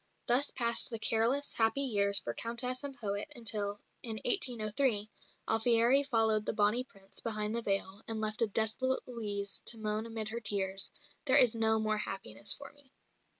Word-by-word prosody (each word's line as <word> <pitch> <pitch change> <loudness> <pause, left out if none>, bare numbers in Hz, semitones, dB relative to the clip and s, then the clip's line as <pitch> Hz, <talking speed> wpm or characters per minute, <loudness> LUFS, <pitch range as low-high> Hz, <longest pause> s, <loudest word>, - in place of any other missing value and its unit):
Thus 255 +4 +2
passed 235 +1 0
the 230 - -5
careless, 230 +6 +2
happy 225 +5 +1
years 200 -5 +6
for - - +1
Countess 250 +3 -2
and 275 -2 -7
poet 205 +3 -5
until, 205 -3 -3 0.2
in 225 -2 -5
1803, 230 - +2 0.4
Alfieri 235 +4 +4
followed 225 -5 +1
the - - -1
"Bonnie 215 +4 +1
Prince" 195 -6 -11
behind 215 -2 -3
the 235 - -1
veil, 195 -1 -1
and 225 -1 -4
left 215 +1 -3
a 230 - +2
desolate 220 +5 -1
Louise 205 -5 -2
to 230 - -2
moan 215 +1 -3
amid 220 -1 -4
her 230 +2 -5
tears, 195 -3 +2 0.4
"There - - +4
is 245 -2 +5
no 220 -1 +1
more 215 -1 -2
happiness 120 - -2
for 280 - -3
me." 285 -2 -20
225 Hz, 170 wpm, -31 LUFS, 210-240 Hz, 0.4 s, years